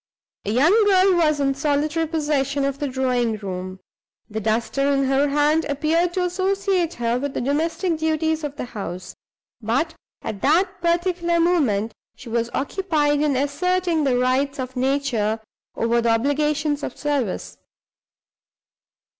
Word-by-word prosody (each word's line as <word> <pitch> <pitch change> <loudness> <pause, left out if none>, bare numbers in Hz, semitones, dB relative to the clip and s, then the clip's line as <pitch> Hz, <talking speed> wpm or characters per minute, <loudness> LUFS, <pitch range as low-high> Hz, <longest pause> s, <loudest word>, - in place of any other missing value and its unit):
A 205 - -1
young 335 - +4
girl 380 -1 +5
was 310 -4 +2
in 275 -1 +2
solitary 300 +3 0
possession 290 -3 0
of 275 0 -2
the 290 - -1
drawing 250 -4 0
room. 185 -2 -6 0.5
The 220 - -2
duster 235 +6 0
in 275 -1 +2
her 270 +2 +2
hand 295 +3 +2
appeared 320 +4 0
to 365 - +1
associate 375 -1 0
her 235 +1 0
with 280 +1 -4
the - - 0
domestic 320 +5 -1
duties 320 0 0
of 290 -1 -4
the 290 - -5
house; 195 -6 -7 0.5
but 255 +9 0 0.3
at 200 -2 -5
that 365 +5 +2
particular 345 0 +1
moment 255 - +1 0.2
she 240 - -11
was 230 0 -1
occupied 295 -2 0
in 295 -2 +1
asserting 345 +4 0
the 260 -3 +2
rights 260 +3 +1
of 260 -1 -5
nature 250 -5 0 0.4
over 235 +1 +1
the 235 - +1
obligations 290 +5 +1
of 260 - -5
service. 280 -9 -2
285 Hz, 145 wpm, -22 LUFS, 250-330 Hz, 0.5 s, girl